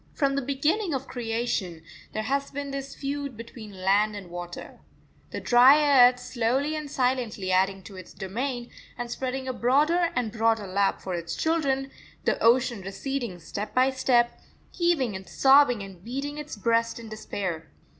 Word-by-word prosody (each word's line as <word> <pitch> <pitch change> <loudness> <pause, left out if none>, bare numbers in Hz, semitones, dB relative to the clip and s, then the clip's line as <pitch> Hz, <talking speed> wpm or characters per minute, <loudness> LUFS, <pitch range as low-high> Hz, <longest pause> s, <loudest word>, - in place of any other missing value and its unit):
From 275 -2 +1
the 280 - 0
beginning 295 - 0
of 265 0 -3
creation 225 -8 -3 0.3
there 215 - -3
has 275 +4 -1
been 280 0 -5
this 275 0 -5
feud 280 -3 -4
between 215 -4 -10
land 205 +2 +3
and 190 -4 -9
water: 175 0 -8 0.5
the - - -5
dry 265 +1 +7
earth 250 0 -8
slowly 250 +5 -1
and 305 -2 -5
silently 250 -8 -1
adding 190 +1 +2
to 195 - -11
its 185 - -10
domain 240 +5 -4 0.3
and 240 -1 -5
spreading 260 +1 -3
a 260 - -1
broader 305 +9 +2
and 240 -3 -1
broader 225 -1 +1
lap 195 +1 0
for 185 - -4
its 170 -1 -4
children; 275 -5 0 0.3
the - - +1
ocean 235 -2 +3
receding 215 +2 -4
step 200 +5 -6
by 260 +1 +4
step, 250 -2 +2 0.3
heaving 320 - +1
and 190 0 -8
sobbing 270 -5 +5
and 190 -3 -12
beating 275 +6 -4
its 300 0 -6
breast 230 +3 +1
in 230 - -9
despair. 190 -6 -5
245 Hz, 165 wpm, -26 LUFS, 205-275 Hz, 0.5 s, dry